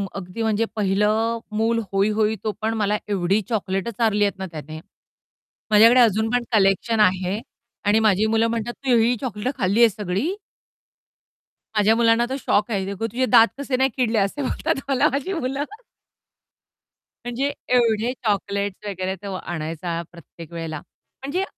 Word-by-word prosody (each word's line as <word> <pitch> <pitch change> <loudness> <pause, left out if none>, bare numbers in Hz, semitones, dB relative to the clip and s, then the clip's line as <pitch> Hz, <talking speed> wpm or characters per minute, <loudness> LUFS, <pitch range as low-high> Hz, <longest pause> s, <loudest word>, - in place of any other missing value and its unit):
अगदी 190 +3 -6
म्हणजे 220 +1 +1
पहिलं 215 +3 +1 0.2
मूल 230 +1 +1
होय, 195 +2 +2
होय 215 0 +1
तो 215 - 0
पण 220 +1 0
मला 210 0 +1
एवढी 195 +2 +1
चॉकलेट 195 -2 -2
चारलीयेतना 205 -3 0
त्याने. 155 0 -8 0.9
माझ्याकडे 230 +4 +7
अजून 220 -1 +3
पण 245 -1 +1
कलेक्शन 205 +2 +2
आहे 185 0 +2 0.5
आणि 210 +2 +4
माझी 215 -1 +3
मुलं 225 +1 +2
म्हणतात, 230 +1 -3
"तू 260 -3 0
ही 235 +2 +3
चॉकलेट 250 +1 -3
खाल्ली 200 +1 +1
आहे 230 - +7
सगळी." 210 - -2 1.4
माझ्या 215 +2 +4
मुलांना 230 0 +3
तर 265 - -2
शॉक 210 -1 +1
आहे, 195 -2 0
"ये 200 - -4
गो, 225 +4 -4
तुझे 255 +4 -1
दात 230 -2 +6
कसे 275 -2 -1
नाही 265 +1 +3
किडले." 235 -3 +1
असे 200 +9 -1
बोलतात 320 +4 -1
मला 265 - +3
माझी 325 +8 -2
मुलं. 275 -3 -2 1.6
म्हणजे 255 +4 -1 0.2
एवढे 230 -1 +2
चॉकलेट्स 200 -1 -2
वगैरे 190 -1 -3
तो 195 -1 -5
आणायचा 165 0 -4
प्रत्येक 170 -1 -13
वेळेला. 160 -2 -5 0.4
म्हणजे 355 +8 -1
215 Hz, 150 wpm, -22 LUFS, 195-235 Hz, 1.6 s, माझ्याकडे